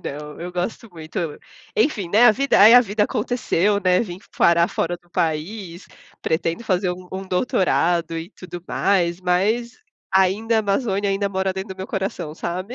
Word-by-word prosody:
não, 150 +2 -7
eu 175 - -5
gosto 180 +5 -4
muito, 160 0 -7
eu 165 -4 -3 0.4
enfim, 220 - +1
né, 215 +7 +5
a 215 - +7
vida 275 0 +2
aí 220 +4 +9
a 245 - +10
vida 210 -2 0
aconteceu, 210 -4 0
né, 185 -1 +3
vim 180 -5 -5 0.2
parar 170 0 +4
fora 175 +1 -2
do 175 -1 -31
país, 170 +3 -3 0.4
pretendo 165 +6 -1
fazer 185 -3 0
um 180 0 -8
um 190 - -4
doutorado, 175 -5 +1
e 165 +4 -8
tudo 175 -4 -10
mais, 180 -3 +1
mas 210 - 0 0.3
ainda 200 +5 +2
a - - +4
Amazônia 200 -1 0
ainda 200 +1 0
mora 190 0 -1
dentro 190 0 -6
do - - -27
meu 190 - -5
coração, 190 -6 -4
sabe. 185 +8 -5
190 Hz, 180 wpm, -22 LUFS, 175-210 Hz, 0.4 s, a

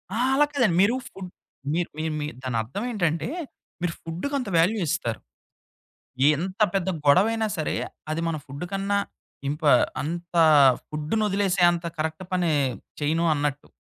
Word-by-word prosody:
ఆ! - - -1 0.2
అలా 295 +2 +5
కాదండి. 235 -11 +2
మీరు 215 +5 +4
ఫుడ్ 190 -6 -9 0.4
మీ 165 - +1 0.2
మీ 155 - -2 0.2
మీరు 150 -4 -4
దానర్థమేంటంటే 165 - -1 0.5
మీరు 175 -1 -1
ఫుడుకంత 250 - -3
వాల్యూ 185 +7 +3
ఇస్తారు. - - -1 1.2
ఎంత 185 +6 -5
పెద్ద 190 -1 0 0.2
గొడవైనా 220 +9 +4
సరే, 155 - -1 0.4
అది 155 +1 -1
మన 165 - -1
ఫుడుకన్నా 195 +8 -2 0.5
ఇంప 150 +3 -3 0.4
అంత 170 +4 -5 0.6
ఫుడునొదిలేసే 195 +4 0
అంత 170 0 -3
కరెక్ట్ 160 +3 -3
పని 180 -2 +1 0.5
చేయను 160 +3 +1
అన్నట్టు. 145 -1 -2
175 Hz, 120 wpm, -25 LUFS, 155-200 Hz, 1.2 s, అలా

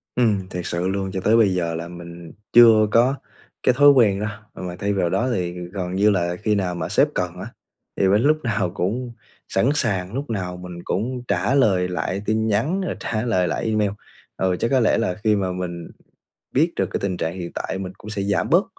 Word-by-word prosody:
Ừm, 105 -6 +1
thiệt 90 -2 -5
sự 85 +2 -2
luôn. 95 0 -2
Cho 95 - -3
tới 110 +4 +4
bây 105 -4 +4
giờ 85 -2 -1
là 85 +1 -5
mình 85 -1 -10 0.2
chưa 115 -2 +7
có 125 +5 +4 0.5
cái 125 - +4
thói 145 0 +8
quen 110 -8 +4
đó, 105 - -2 0.3
mà 90 -1 -6
thay 100 0 0
vào 90 -3 +1
đó 125 +8 0
thì 90 -3 -2 0.2
gần 90 -2 -3
như 105 +2 +4
là 90 -3 0
khi 105 +2 0
nào 90 -3 -1
mà 85 - -4
sếp - - +4
cần 90 -2 -2
á, 100 - -6 0.5
thì 95 - +3
mình 100 +3 +4
lúc 150 +4 +3
nào 110 -7 0
cũng 120 +7 -2 0.4
sẵn 105 +7 +1
sàng, 100 -9 -1
lúc 140 +3 -4
nào 90 -5 -3
mình 90 -1 -9
cũng 125 +5 -2
trả 95 +9 +1
lời 95 -9 +3
lại 90 +2 -3
tin 110 +1 0
nhắn, 125 - 0
rồi 185 - -3
trả 110 - -2
lời 110 -7 +1
lại 85 - -2
email. 110 -2 +1 0.5
Ừ, 95 -1 +1
chắc - - +1
có 135 - +4
lẽ 115 - +3
là 90 -6 0
khi 110 -1 +3
mà 95 -2 -1
mình 90 -2 -5 0.7
biết 165 +5 +2
được - - +1
cái - - -1
tình 95 -2 -2
trạng 80 0 -2
hiện 85 -1 -5
tại - - -3
mình 95 -1 -6
cũng 105 - -10
sẽ 105 -2 -3
giảm 100 -3 0
bớt - - +4
100 Hz, 225 wpm, -22 LUFS, 90-115 Hz, 0.7 s, thói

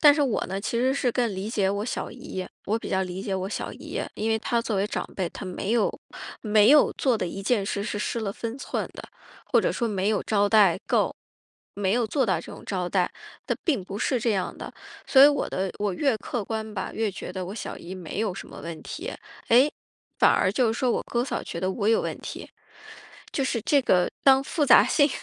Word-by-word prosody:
但 295 -2 +8
是 295 - +2
我 260 -6 +1
呢， 190 +2 -3
其 235 +3 -2
实 260 +2 +2
是 250 -4 +1
更 240 -2 +1
理 195 +3 -4
解 200 -4 +1
我 200 +1 -2
小 - - -3
姨， 190 -7 -6 0.2
我 220 +3 0
比 - - -7
较 190 0 +1
理 180 +1 -5
解 195 -1 -2
我 190 0 -2
小 - - -4
姨， - - -6
因 220 +1 -1
为 220 - +2
她 235 +1 0
作 220 -4 -2
为 195 - +1
长 - - -3
辈， 185 -3 -1
她 - - -8
没 190 +3 -3
有 235 -2 +2 0.5
没 215 +1 +5
有 300 -1 +6
做 250 -5 +1
的 180 - -1
一 195 +3 -6
件 215 -1 +1
事 200 - -2
是 205 - -3
失 230 +2 -2
了 200 -2 -2
分 230 +3 -5
寸 - - -3
的， - - -8 0.4
或 - - +3
者 - - +1
说 240 - -1
没 200 -2 0
有 215 -2 +1
招 205 -1 +2
待 200 -5 +5
够 - - +2 0.6
没 200 +1 +1
有 240 -2 +1
做 260 +2 +1
到 185 -4 +2
这 - - -10
种 - - -11
招 185 -3 -2
待， 180 -2 +1 0.4
她 - - +1
并 275 - +1
不 200 +2 -6
是 250 -1 0
这 230 -1 +1
样 190 -2 -2
的， - - -6 0.4
所 265 - +7
以 280 - +11
我 285 -2 0
的 190 0 -2
我 205 -2 0
越 275 +1 +2
客 235 -5 -4
观 220 0 -4
吧， - - -3
越 220 -2 0
觉 180 -1 -7
得 185 -1 -4
我 195 - -6
小 - - -5
姨 180 +3 -8
没 180 +1 -7
有 205 -5 -1
什 - - -8
么 - - -10
问 165 -1 -7
题， - - -6 0.4
诶， 255 +6 +5 0.5
反 - - +6
而 185 - +2
就 235 -1 +2
是 225 - -5
说 255 -3 +2
我 - - -1
哥 240 +1 -1
嫂 - - -3
觉 - - -6
得 185 0 0
我 205 +2 -1
有 225 - +4
问 - - -4
题。 - - -8 0.8
就 275 - 0
是 250 - 0
这 285 - +3
个 180 -7 +3
当 270 0 +6
复 295 -1 0
杂 245 - +8
性 285 -1 +4
215 Hz, 265 characters per minute, -26 LUFS, 190-245 Hz, 0.8 s, 以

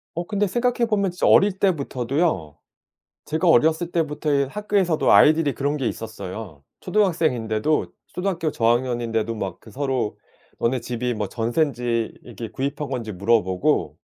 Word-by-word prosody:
어, 170 +1 -3
근데 205 +1 0
생각해 240 +3 +1
보면 200 -4 +1
진짜 180 - 0
어릴 195 -1 +5
때부터도요. 140 - 0 0.7
제가 160 +3 0
어렸을 160 +4 +3
때부터의 150 -4 0
학교에서도 195 -3 +1
아이들이 155 -2 +5
그런 145 +2 -1
게 135 -5 -2
있었어요. 100 -7 -7 0.2
초등학생인데도 155 - +1 0.2
초등학교 180 -4 -2
저학년인데도 115 -2 0
막 95 -4 -5
그 110 - -15
서로 130 -2 -2 0.4
너네 125 +2 0
집이 120 +1 -2
뭐 105 -2 -3
전세인지 120 0 -1
이게 115 -1 -7
구입한 140 +2 -3
건지 115 -5 -3
물어보고 95 -2 +1
135 Hz, 355 characters per minute, -23 LUFS, 115-165 Hz, 0.7 s, 어릴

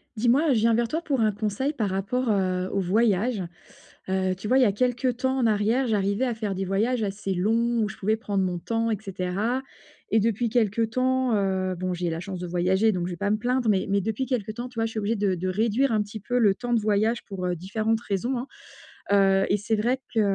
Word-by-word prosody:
Dis-moi, 250 +8 +3
je 225 - +2
viens 230 +1 +3
vers 235 +1 +2
toi 320 +7 -3
pour 275 -6 0
un 215 -1 +3
conseil 215 +8 -2
par 215 -7 -1
rapport, 220 +6 -1
heu, 185 -2 0
aux 195 - 0
voyages. 205 +2 +1 0.7
Heu 190 0 0
tu 195 - -8
vois, 255 +5 +4
il - - +5
y - - +7
a 215 - +4
quelque 245 +4 0
temps 260 +2 0
en 245 - +2
arrière, 220 +4 +2
j'arrivais 200 +2 +1
à 245 -2 -1
faire 215 -3 -3
des 190 +1 -2
voyages 220 +6 0
assez 200 -1 -2
longs, 230 +5 +1
où 210 - 0
je - - -9
pouvais 215 +3 0
prendre 200 -3 -1
mon 180 -1 -2
temps, 230 +4 -1
et - - 0
cetera. 195 +5 -2 0.5
Et 220 - +5
depuis 230 +2 +1
quelque 225 -1 +1
temps 255 +2 +1
heu, 190 -2 0
bon, 185 +1 -2
j'ai 175 -1 -2
la 165 0 -3
chance 185 +1 -6
de 180 - -4
voyager, 185 +5 +2
donc 180 -2 -2
je - - -4
vais - - -5
pas 205 +2 -1
me 215 - +2
plaindre. 245 +1 0
Mais 195 -3 +2
mais 200 0 +2
depuis 220 +6 -2
quelque 230 -5 -2
temps, 240 +3 -6
tu 245 -2 -12
vois, 225 - +2
je - - -5
suis 220 - -2
obligée 215 +3 0
de 200 -2 +1
de 185 +1 -3
réduire 225 +7 +1
un 215 - +2
petit 210 +1 -8
peu 245 +4 -1
le 205 -4 +4
temps 240 +2 -2
de 230 - +3
voyage 215 +2 +1
pour 190 -2 -5
heu 180 -1 -1
différentes 220 +5 -1
raisons, 235 +5 -2
hein. 250 - -5 0.7
Heu 195 -1 +4
et 200 - +3
c'est 210 +2 -1
vrai 245 +5 0
que, 225 - +2
215 Hz, 250 wpm, -25 LUFS, 195-235 Hz, 0.7 s, y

